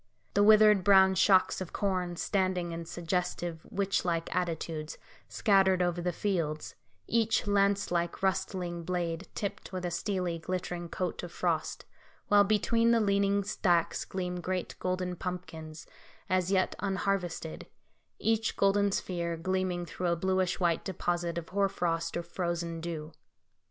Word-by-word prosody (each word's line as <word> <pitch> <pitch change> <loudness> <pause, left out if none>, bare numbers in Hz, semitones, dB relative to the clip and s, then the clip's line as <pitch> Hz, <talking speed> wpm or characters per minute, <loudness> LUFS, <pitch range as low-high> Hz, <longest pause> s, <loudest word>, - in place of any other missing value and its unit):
The 205 - +3
withered 210 -2 +7
brown 190 0 +6
shocks 190 0 +4
of 185 - -6
corn, 185 -3 -1
standing 185 -2 0
in 165 0 -5
suggestive, 175 -1 -3
witch 195 0 0
like 165 -2 -1
attitudes, 165 -3 -3 0.3
scattered 190 -3 +3
over 175 0 0
the 180 +1 0
fields, 165 -5 -2 0.3
each 225 -1 +1
lance 200 -1 +2
like 170 +1 -1
rustling 185 -3 -1
blade 170 0 -2
tipped 200 - -4
with 185 -1 -4
a 175 - -2
steely, 180 -2 -2
glittering 175 0 -4
coat 180 -1 -3
of 175 - -7
frost; 165 -4 -2 0.4
while 205 0 +7
between 230 +3 +2
the 235 0 +5
leaning 200 -1 +2
stacks 175 -4 +1
gleam 180 -1 -4
great 185 0 -3
golden 185 0 -2
pumpkins, 165 -3 -6 0.4
as 185 0 +1
yet 185 -1 +2
unharvested, 190 -4 -2 0.5
each 225 -1 0
golden 200 0 +3
sphere 170 -3 -2
gleaming 185 0 -1
through 180 +1 -3
a 170 - +2
bluish 185 +1 0
white 170 -3 +1
deposit 175 -2 -2
of 165 -1 -5
hoar 200 0 +1
frost, 165 -2 -1
or 170 - -3
frozen 170 -1 -3
dew. 160 -2 -5
180 Hz, 140 wpm, -30 LUFS, 170-195 Hz, 0.5 s, withered